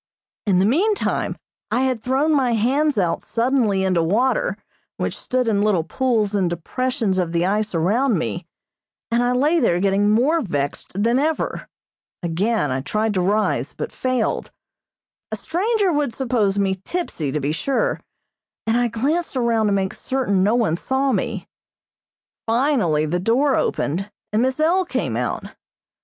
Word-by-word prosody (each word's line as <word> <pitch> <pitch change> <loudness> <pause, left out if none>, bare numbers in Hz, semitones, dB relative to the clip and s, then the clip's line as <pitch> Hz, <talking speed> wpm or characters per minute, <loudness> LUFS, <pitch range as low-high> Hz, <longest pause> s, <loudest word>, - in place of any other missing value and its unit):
In 190 -3 +3
the 185 - +4
meantime 385 - +1 0.3
I 250 - +1
had 260 -4 0
thrown 270 +6 +1
my 260 -5 +2
hands 270 +6 +1
out 175 -4 +1
suddenly 230 -5 +1
into 185 -3 +2
water 255 - +1 0.4
which - - -2
stood 250 -1 -1
in 205 -3 +2
little 205 -6 +2
pools 220 +2 0
in 195 -3 +2
depressions 200 - -1
of 170 -2 -1
the 170 +1 +1
ice 210 0 0
around 215 +8 +2
me, 115 -10 -3 0.6
and 235 +1 +2
I 245 0 +2
lay 295 +7 +3
there 175 - +2
getting 200 +2 +2
more 270 +10 +3
vexed 160 - -3
than 235 +3 +3
ever. 310 +2 -1 0.6
Again 175 - 0
I 130 +1 -1
tried 215 +8 -1
to 185 - +1
rise, 210 +4 0
but - - -5
failed. 255 -3 -1 0.8
A - - -1
stranger 395 +2 0
would 290 -6 -1
suppose 230 -7 0
me 190 -2 0
tipsy, 195 - -3
to 150 - -1
be 145 +1 -1
sure, 275 - -1 0.6
and 225 - +1
I 245 0 +2
glanced 280 +7 -1
around 230 -3 +2
to - - +1
make 195 -1 0
certain 250 -8 0
no 210 +5 +3
one 215 -9 +1
saw 265 +6 0
me. 220 -3 -2 1.0
Finally 225 - +2
the 175 +4 -1
door 255 +8 +2
opened, 185 +8 -1 0.2
and 215 - +3
Miss 260 +3 0
L. 345 +5 +3
came 360 - -2
out. - - -3
225 Hz, 160 wpm, -21 LUFS, 190-265 Hz, 1.0 s, the